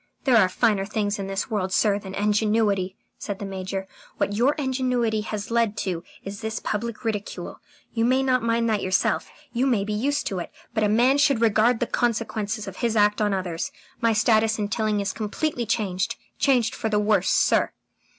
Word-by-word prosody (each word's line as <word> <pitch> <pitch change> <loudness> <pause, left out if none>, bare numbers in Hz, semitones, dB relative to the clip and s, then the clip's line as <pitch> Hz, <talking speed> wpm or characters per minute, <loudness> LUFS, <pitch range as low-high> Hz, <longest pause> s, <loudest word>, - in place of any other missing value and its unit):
"There 255 -5 +5
are 190 -4 +5
finer 210 0 +2
things 205 0 -2
in 195 - -3
this 195 +2 -3
world, 190 -3 -1
sir, 205 +1 +2
than 190 -1 -8
ingenuity," 210 -2 +1 0.2
said 200 - -4
the 200 - -6
Major. 190 0 -4 0.3
"What 205 - 0
your 245 +7 +3
ingenuity 250 -5 0
has 210 0 -5
led 230 -3 +1
to 175 -3 -2 0.2
is 200 +2 -7
this 220 0 -3
public 230 +2 -4
ridicule. 210 -2 -4 0.3
You 230 - 0
may 260 +3 +3
not 255 -1 +2
mind 230 0 +1
that 215 -2 +1
yourself 185 +1 +1 0.2
you 255 +3 +1
may 230 -7 +2
be 210 +1 -3
used 280 +7 0
to 190 - -2
it 175 - -6 0.2
but 220 -2 +1
a 210 - +3
man 245 +6 +4
should 285 -4 +4
regard 225 +1 +3
the - - +1
consequences 220 -2 -1
of 190 - -7
his 230 -2 0
act 210 0 +3
on 210 -1 +2
others.... 185 -4 -2 0.3
My 230 -1 +3
status 220 0 +3
in 205 -1 -2
Tilling 215 -1 0
is 200 -1 -2
completely 235 +3 -2
changed. 200 -4 -1 0.2
Changed 245 -5 +3
for 220 - -2
the 210 - +1
worse, 210 0 +2
sir." - - +3
215 Hz, 195 wpm, -24 LUFS, 200-235 Hz, 0.3 s, There